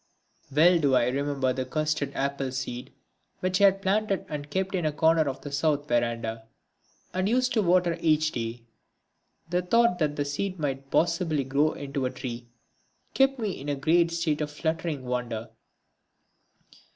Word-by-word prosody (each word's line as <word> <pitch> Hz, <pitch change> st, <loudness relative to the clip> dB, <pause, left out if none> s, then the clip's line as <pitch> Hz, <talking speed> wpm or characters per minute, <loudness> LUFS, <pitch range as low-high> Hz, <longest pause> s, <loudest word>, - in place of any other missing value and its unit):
Well 170 Hz, +5 st, +5 dB
do 140 Hz, -4 st, +3 dB
I 120 Hz, -1 st, +3 dB
remember 135 Hz, -1 st, 0 dB
the 130 Hz, -, -2 dB
custard 155 Hz, +1 st, -1 dB
apple 140 Hz, -1 st, -1 dB
seed 125 Hz, -1 st, -5 dB, 0.5 s
which 185 Hz, +1 st, 0 dB
I -, -, +8 dB
had 195 Hz, 0 st, +3 dB
planted 200 Hz, 0 st, +1 dB
and 145 Hz, -1 st, -5 dB
kept 190 Hz, +4 st, -2 dB
in 180 Hz, -3 st, 0 dB
a 155 Hz, -, +1 dB
corner 160 Hz, 0 st, +3 dB
of 135 Hz, -, -6 dB
the 145 Hz, -, -7 dB
south 145 Hz, 0 st, 0 dB
verandah, 115 Hz, -2 st, -1 dB, 0.7 s
and 185 Hz, +2 st, 0 dB
used 255 Hz, +2 st, +2 dB
to 220 Hz, -, +3 dB
water 180 Hz, -2 st, +3 dB
every 165 Hz, -2 st, +3 dB
day. 120 Hz, -7 st, -3 dB, 0.9 s
The 180 Hz, 0 st, +2 dB
thought 180 Hz, 0 st, +3 dB
that 150 Hz, -2 st, 0 dB
the 145 Hz, -, -1 dB
seed 185 Hz, +7 st, -3 dB
might 135 Hz, -3 st, -3 dB
possibly 165 Hz, -3 st, +1 dB
grow 140 Hz, +4 st, +1 dB
into 140 Hz, -2 st, -3 dB
a -, -, -2 dB
tree 120 Hz, -2 st, -7 dB, 0.7 s
kept 270 Hz, 0 st, +3 dB
me 215 Hz, -4 st, -2 dB
in 145 Hz, -4 st, -6 dB
a 145 Hz, -, 0 dB
great 165 Hz, +5 st, +3 dB
state 165 Hz, -3 st, -1 dB
of 150 Hz, -, -1 dB
fluttering 160 Hz, -2 st, -3 dB
wonder. 120 Hz, -2 st, -3 dB
150 Hz, 165 wpm, -27 LUFS, 135-175 Hz, 0.9 s, I